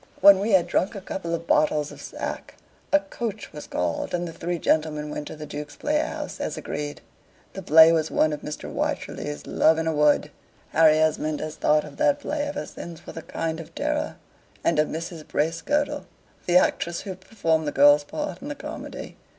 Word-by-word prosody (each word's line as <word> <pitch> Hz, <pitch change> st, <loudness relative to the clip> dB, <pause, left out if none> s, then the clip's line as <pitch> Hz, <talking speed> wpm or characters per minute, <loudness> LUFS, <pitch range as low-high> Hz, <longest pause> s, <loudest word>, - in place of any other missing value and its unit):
When 200 Hz, -1 st, +8 dB
we 205 Hz, +2 st, 0 dB
had 185 Hz, -3 st, +5 dB
drunk 200 Hz, -, 0 dB
a -, -, -4 dB
couple 170 Hz, -3 st, -3 dB
of 165 Hz, 0 st, -7 dB
bottles 150 Hz, -2 st, +2 dB
of -, -, -11 dB
sack, -, -, -6 dB, 0.4 s
a 295 Hz, -, +5 dB
coach 230 Hz, -, -5 dB
was 150 Hz, -, -8 dB
called, 90 Hz, -, -1 dB
and 175 Hz, 0 st, -2 dB
the 165 Hz, -, -7 dB
three 175 Hz, +2 st, -3 dB
gentlemen 150 Hz, -2 st, 0 dB
went 150 Hz, 0 st, -5 dB
to -, -, -7 dB
the 155 Hz, 0 st, -7 dB
Duke's 145 Hz, 0 st, -7 dB
Playhouse, 300 Hz, +1 st, -2 dB
as -, -, -3 dB
agreed. 145 Hz, 0 st, -5 dB, 0.5 s
The -, -, -6 dB
play 160 Hz, +2 st, +8 dB
was 160 Hz, -1 st, +1 dB
one 155 Hz, -1 st, +2 dB
of 150 Hz, -, -5 dB
Mr. 150 Hz, -, -6 dB
Wycherley's 145 Hz, 0 st, -3 dB
"Love 160 Hz, 0 st, +3 dB
in 160 Hz, -, -1 dB
a 160 Hz, -, +1 dB
Wood." 150 Hz, -1 st, +3 dB, 0.4 s
Harry 155 Hz, -1 st, +5 dB
Esmond 155 Hz, -1 st, +1 dB
has 155 Hz, 0 st, -5 dB
thought 150 Hz, 0 st, +3 dB
of -, -, -11 dB
that 290 Hz, -1 st, +3 dB
play 300 Hz, 0 st, -2 dB
ever 290 Hz, 0 st, -3 dB
since 170 Hz, -2 st, -9 dB
with -, -, -9 dB
a 165 Hz, -, -5 dB
kind 160 Hz, 0 st, -3 dB
of 165 Hz, -, -10 dB
terror, -, -, -1 dB, 0.5 s
and -, -, +2 dB
of 150 Hz, -, +3 dB
Mrs. 165 Hz, 0 st, -5 dB
Bracegirdle, 165 Hz, -, 0 dB, 0.4 s
the 175 Hz, 0 st, +6 dB
actress 170 Hz, -1 st, +1 dB
who 195 Hz, -, -5 dB
performed 170 Hz, -5 st, -1 dB
the -, -, 0 dB
girl's 145 Hz, +1 st, +6 dB
part 300 Hz, -, -5 dB
in 280 Hz, -, -7 dB
the 290 Hz, -, -4 dB
comedy. -, -, -8 dB
160 Hz, 200 wpm, -25 LUFS, 150-190 Hz, 0.5 s, When